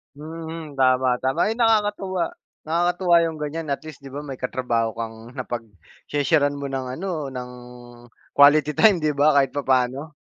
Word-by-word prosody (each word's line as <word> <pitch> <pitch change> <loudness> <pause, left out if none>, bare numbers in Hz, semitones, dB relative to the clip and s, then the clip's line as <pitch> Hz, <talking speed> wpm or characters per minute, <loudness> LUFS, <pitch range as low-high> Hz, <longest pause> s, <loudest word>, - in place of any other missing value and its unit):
Hmm. 160 -1 -8
Tama, 130 -1 +3
tama 130 +6 -1
ay - - 0
nakakatuwa 205 -5 +1 0.3
nakakatuwa 175 +2 +2
yung 160 -1 -4
ganiyan 155 +2 -4
at - - -5
least 155 -4 -9
'di 135 -1 -12
ba 145 - -4
may 135 -3 -7
katrabaho 120 -3 -1
kang 115 +1 -7
napagse-share-an 130 - -2
mo 140 -1 -5
ng 135 -1 -3
ano 190 +5 -4 0.2
ng 125 0 -6 0.9
quality 145 +1 +6
time 205 -7 +5
'di 155 -1 +2
ba 150 +1 +5
kahit 135 -2 +4
papano. 135 +2 0
145 Hz, 150 wpm, -23 LUFS, 130-165 Hz, 0.9 s, quality